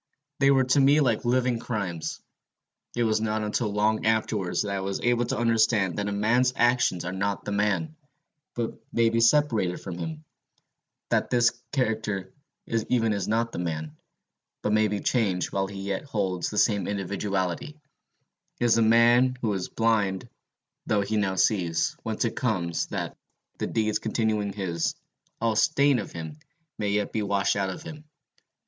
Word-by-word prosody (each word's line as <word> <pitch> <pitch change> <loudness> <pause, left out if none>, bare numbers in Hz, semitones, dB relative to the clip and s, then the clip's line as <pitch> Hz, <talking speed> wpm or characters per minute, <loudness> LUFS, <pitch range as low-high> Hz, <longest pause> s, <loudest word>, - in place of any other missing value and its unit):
They 135 0 +5
were 135 -1 +5
to 130 +2 +2
me 140 +2 +5
like 120 -5 +1
living 125 -1 +1
crimes. 100 -9 -4 0.7
It 120 - +1
was 110 -1 +1
not 110 0 -1
until 105 +1 -1
long 105 +1 +1
afterwards 110 -5 0
that 100 - -4
I - - -1
was 95 0 -3
able 120 0 +2
to - - -2
understand 110 -5 +2
that 105 - -1
a - - -1
man's 120 +5 +2
actions 120 -8 +2
are 90 - -3
not 100 +1 -2
the - - -3
man, 105 +10 0 0.6
but 120 -2 -2 0.2
may 115 -1 +3
be 115 - +1
separated 115 -8 +3
from 90 -3 -7
him; 160 -1 -5 0.9
that - - +1
his 120 -1 +4 0.2
character 110 -7 -1 0.3
even 115 0 0
is 100 -2 -2
not 115 +2 0
the - - -5
man, 80 -3 -4 0.7
but 105 - +1
may 110 0 +4
be 105 -1 -2
changed 100 -8 0
while 95 0 0
he 100 0 -8
yet 100 +5 -3
holds 95 -9 -2
the 105 - -6
same 100 -5 +2
individuality, 100 - -2 0.8
is 120 -1 +3
the 115 - +3
man 120 +3 +5
who 115 - 0
was 95 -3 -2
blind 105 -5 0 0.6
though 105 -1 +2
he 100 +2 -2
now 100 -3 +1
sees; 85 -5 +1
whence - - -2
it - - -2
comes, 85 -2 -1
that, - - -4 0.4
the - - -1
deeds 110 -1 0
continuing 110 -2 -1
his, 90 -5 -2 0.4
all 115 -1 +1
stain 140 +3 +3
of 105 - -6
them 80 -2 -7 0.4
may 105 -1 0
yet 105 0 0
be 110 - -1
washed 100 -1 +1
out 100 -1 0
of 155 - -7
him. 155 -3 -9
110 Hz, 170 wpm, -26 LUFS, 95-120 Hz, 0.9 s, They